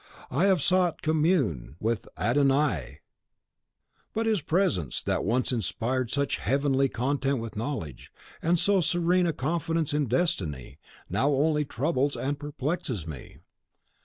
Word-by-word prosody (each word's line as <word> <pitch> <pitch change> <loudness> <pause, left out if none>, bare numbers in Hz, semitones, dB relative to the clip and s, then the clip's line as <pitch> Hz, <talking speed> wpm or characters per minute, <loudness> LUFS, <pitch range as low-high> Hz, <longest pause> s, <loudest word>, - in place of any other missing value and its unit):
I - - +2
have 190 -7 +3
sought 180 -2 +2
commune 150 - +1
with 115 +1 -1
Adon 135 +5 +3
Ai; 145 +1 0 1.1
but 225 +1 0
his 220 -5 +1
presence, 140 - 0
that - - 0
once 125 +5 +1
inspired 120 +2 -1
such 140 +2 0
heavenly 135 0 +1
content 135 +3 0
with 115 -1 -6
knowledge, 110 - -5 0.3
and 170 +2 +2
so 195 +2 +3
serene 175 +1 +2
a - - +2
confidence 160 +2 -1
in 145 -2 +1
destiny, 80 - -1 0.3
now 140 - +1
only 150 +1 +2
troubles 140 +2 0
and 140 +2 -2
perplexes 145 - -3
me. 75 -6 -9
140 Hz, 130 wpm, -27 LUFS, 120-165 Hz, 1.1 s, have